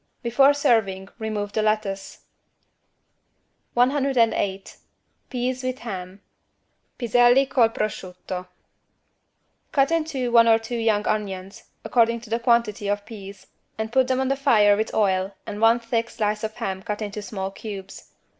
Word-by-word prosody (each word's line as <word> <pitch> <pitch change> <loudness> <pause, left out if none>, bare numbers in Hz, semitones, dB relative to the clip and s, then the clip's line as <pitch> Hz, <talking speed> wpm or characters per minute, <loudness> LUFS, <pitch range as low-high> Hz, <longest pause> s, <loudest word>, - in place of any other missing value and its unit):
Before 270 +4 +4
serving 210 -9 +1
remove 210 -2 -3
the 215 - +1
lettuce. 215 -2 -2 1.5
108 245 -7 +1 0.5
PEAS 255 0 -2
WITH 255 0 -2
HAM 190 -4 -7 0.8
(Piselli 245 +2 +4
col 240 -4 +3
prosciutto) 185 -4 -5 1.2
Cut 275 +1 +2
in 330 -1 +2
two 265 -6 -3
one 230 -1 +6
or 225 -1 +6
two 225 +2 -8
young 220 -2 +1
onions, 200 0 -3 0.2
according 235 -1 +2
to 225 -2 -13
the 230 - +1
quantity 235 -4 +1
of 205 0 0
the - - -30
peas 200 -3 -10 0.3
and 220 0 -3
put 260 +1 +3
them 260 0 +1
on 265 0 0
the 275 - +2
fire 210 -7 +4
with 220 +2 -2
oil 190 -2 +1
and 205 - -6
one 225 +1 +5
thick 230 0 -2
slice 210 -2 -2
of 220 0 -4
ham 190 -1 -4
cut 210 +2 -4
into 210 0 -5
small 195 -2 -5
cubes. 195 -1 -9
220 Hz, 145 wpm, -24 LUFS, 205-240 Hz, 1.5 s, one